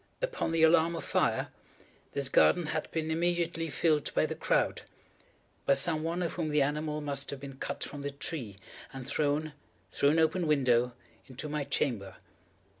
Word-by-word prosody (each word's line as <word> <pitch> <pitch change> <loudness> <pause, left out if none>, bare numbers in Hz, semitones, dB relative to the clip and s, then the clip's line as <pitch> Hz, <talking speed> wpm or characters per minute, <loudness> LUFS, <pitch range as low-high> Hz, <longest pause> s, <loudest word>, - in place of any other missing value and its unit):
Upon - - -2
the 165 -1 +2
alarm 165 +1 +5
of 165 - -5
fire, - - +1 0.6
this 140 -1 0
garden 175 +5 +4
had 155 - -2
been 160 -1 -2
immediately 170 0 0
filled 150 0 +1
by - - +3
the - - -3
crowd—by 140 - -3
some 155 +3 +3
one 170 +3 -1
of 170 - -2
whom 165 -3 -2
the 150 -1 +3
animal 150 +1 -2
must 140 -1 -2
have 140 - -4
been 135 -1 -9
cut - - -4
from 145 - -6
the 140 - -3
tree 140 - -4 0.3
and 135 -2 -8
thrown, 150 +2 0 0.4
through 140 - +3
an 155 - +2
open 160 +2 +2
window, 125 -4 +3 0.3
into 135 +3 -5
my 150 -1 -2
chamber. 115 -9 -1
150 Hz, 170 wpm, -30 LUFS, 140-165 Hz, 0.6 s, alarm